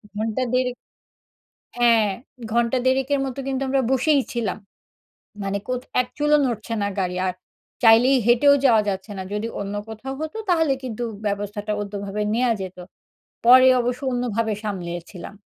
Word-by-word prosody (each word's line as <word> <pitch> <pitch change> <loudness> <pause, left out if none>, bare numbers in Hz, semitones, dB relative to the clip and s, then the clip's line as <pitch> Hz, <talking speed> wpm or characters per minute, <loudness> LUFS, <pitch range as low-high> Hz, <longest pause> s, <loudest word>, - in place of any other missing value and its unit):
ঘন্টা 220 +4 -1
১.৫ 250 -1 +1 1.0
হ্যাঁ, 230 -3 +4 0.4
ঘন্টা 235 +2 +2
১.৫ 260 0 +2
এর - - -1
মতো 265 0 -5
কিন্তু 270 0 -2
আমরা 265 0 +2
বসেই 275 +2 +3
ছিলাম। 225 -6 -2 0.9
মানে 195 +1 -2
কোথ 250 -1 -1 0.2
এক 250 - -1
চুলও 295 0 +4
নড়ছে 230 -1 -3
না 200 - 0
গাড়ি 180 -1 -2
আর 185 - -1 0.5
চাইলেই 240 +4 +6
হেঁটেও 245 +4 +6
যাওয়া 225 -5 +5
যাচ্ছে 195 +1 -3
না। - - -3
যদি 210 +2 -2
অন্য 200 0 -4
কোথাও 235 +5 -6
হত 315 +3 -4 0.2
তাহলে 325 -5 +3
কিন্তু 245 -2 -5 0.2
ব্যবস্থাটা 205 +1 -3
অন্যভাবে 200 0 -4
নেওয়া 245 0 +2
যেত। 190 -1 -6 0.7
পরে 255 +2 +8
অবশ্য 245 +2 -2
অন্যভাবে 230 -3 -1
সামলিয়েছিলাম। 175 -2 -6
230 Hz, 145 wpm, -23 LUFS, 205-255 Hz, 1.0 s, পরে